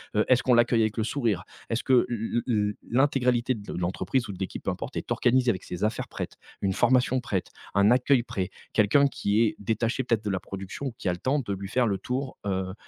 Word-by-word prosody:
Heu, 105 - +3
est-ce 130 -1 +4
qu'on 125 - +3
l'accueille 120 -1 +4
avec 110 0 0
le 110 - +1
sourire? 115 -10 -1 0.2
Est-ce 115 +1 -1
que 130 -2 +5
l 115 0 -1
l 125 - 0
l 105 -1 +1 0.2
l'intégralité 125 -2 +2
de 105 -1 -8
l - - -5
l'entreprise 110 +7 -1
ou 100 - -5
de 90 - -10
l'équipe, 95 - -4
peu - - 0
importe, - - -6
est - - -5
organisée 125 0 +3
avec 95 - -5
ses 90 +4 -3
affaires 110 - -2
prêtes? - - -5 0.3
Une 95 -1 +1
formation 130 +2 +3
prête? 95 -6 -2 0.3
Un 100 +3 +5
accueil 125 0 +4
prêt? 100 -7 -3 0.2
Quelqu'un 120 +7 +4
qui 105 -4 0
est 115 - +2
détaché 115 +5 -1
peut-être 115 -3 0
de 105 - 0
la 95 -1 -1
production 95 +8 -6
ou 120 - -5
qui - - -5
a 90 - +2
le 90 - -7
temps 140 +8 +1
de 115 -7 -3
lui 95 0 -6
faire 125 +2 +2
le 100 -2 0
tour, 130 +4 -4
heu 95 -1 -2
115 Hz, 240 wpm, -27 LUFS, 100-125 Hz, 0.3 s, que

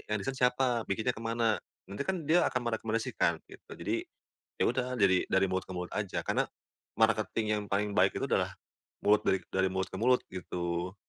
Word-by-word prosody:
yang 105 - +1
desain 135 - -2
siapa, 125 -2 +2
bikinnya 110 +5 0
kemana?" 115 0 0 0.3
Nanti 100 +8 -4
kan 180 -1 -2
dia 170 +2 +5
akan 130 - -1
merekomendasikan 115 0 0
gitu. - - -15
Jadi - - -1 0.6
ya - - +3
udah 125 +1 -1
dari 95 -2 +4
dari 95 0 +3
mulut 95 0 -1
ke - - -5
mulut 90 0 -5
aja, 100 -3 -2
karena - - +1 0.5
marketing 110 0 +2
yang - - -3
paling 100 +1 +1
baik 105 - +3
itu - - -1
adalah - - +1 0.5
mulut 105 +1 +5
dari 95 - +4
dari 95 0 +2
mulut 95 0 -1
ke 95 - -6
mulut, 125 +2 +4
gitu. 90 0 -3
110 Hz, 185 wpm, -31 LUFS, 95-125 Hz, 0.6 s, dia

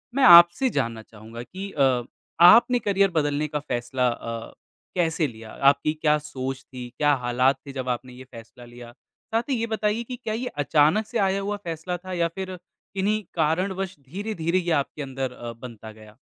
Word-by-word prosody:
मैं 275 - +2
आपसे 175 +5 +8
जानना 115 -1 -3
चाहूँगा 110 +2 -11
कि 190 +10 -8
अ, 130 -4 +2 0.4
आपने 240 +8 +7
करियर 200 -3 +2
बदलने 150 -2 0
का 150 0 -3
फैसला 125 -1 -2
अ, 115 -1 -6 0.4
कैसे 165 -3 +1
लिया? 110 -3 -11
आपकी 140 +2 +2
क्या 150 -1 +2
सोच 135 -3 -6
थी? 125 -1 -7
क्या 145 -1 +3
हालात 125 +1 +1
थे 140 - -6
जब 130 -2 -4
आपने 125 +1 -4
ये 125 +1 -11
फैसला 115 +1 -13
लिया? 120 0 -12 0.4
साथ 225 +1 +2
ही 270 - +1
ये 230 - -1
बताइए 220 +1 -1
की 250 +2 -7
क्या 215 - -2
ये 240 +3 -3 0.2
अचानक 160 +10 +3
से - - -3
आया 190 +1 0
हुआ 205 +1 -3
फैसला 170 +1 -4
था 185 +1 -8
या 170 -1 +1
फिर 185 -1 -5 0.4
किन्हीं 210 +3 0
कारणवश 185 +4 -1
धीरे-धीरे 170 +3 -3
ये 175 -1 -2
आपके 150 - -11
अंदर 135 -2 -4
अ, 120 -1 -8
बनता 115 -2 -10
गया? 110 0 -16
150 Hz, 185 wpm, -24 LUFS, 125-190 Hz, 0.4 s, आपसे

